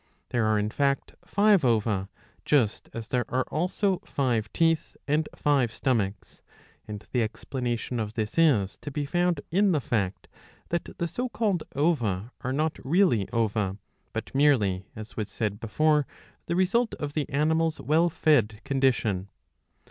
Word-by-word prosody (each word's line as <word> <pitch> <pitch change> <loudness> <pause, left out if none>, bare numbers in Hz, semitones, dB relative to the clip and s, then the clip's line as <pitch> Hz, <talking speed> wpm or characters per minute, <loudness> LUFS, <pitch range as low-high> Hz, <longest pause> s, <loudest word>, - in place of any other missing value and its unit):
There 120 -3 +1
are 110 0 +3
in 105 +1 -1
fact 140 +1 0
five 205 -4 +3
ova, 105 -5 +1 0.3
just 125 -8 +1
as 115 -1 -7
there 125 -1 +1
are 130 +1 +1
also 185 +3 0
five 120 -6 -1
teeth 165 -2 +1
and 150 +2 +1
five 135 -6 +2
stomachs; 110 -7 -2 0.5
and 105 0 -7
the 125 - +1
explanation 120 +1 -3
of 110 -1 -4
this 110 -2 -2
is 130 - +3
to - - -5
be 145 +1 -3
found 175 +3 +1
in 195 +2 +3
the 155 - +2
fact 100 -7 -2 0.4
that 170 - -3
the 170 - -1
so 250 +8 -3
called 205 -8 0
ova 120 - 0
are 130 - -2
not 155 +3 -1
really 140 - +3
ova, 105 -4 0 0.3
but 110 0 -5
merely, 110 -10 +3
as 110 0 -9
was 105 -2 -3
said 105 0 -2
before, 150 +6 +2 0.4
the 170 - 0
result 200 +6 +2
of 145 -1 -5
the 150 -3 -2
animal's 160 +3 +1
well 165 +4 +3
fed 120 -10 +2
condition. 125 -8 +1
130 Hz, 155 wpm, -27 LUFS, 110-160 Hz, 0.5 s, are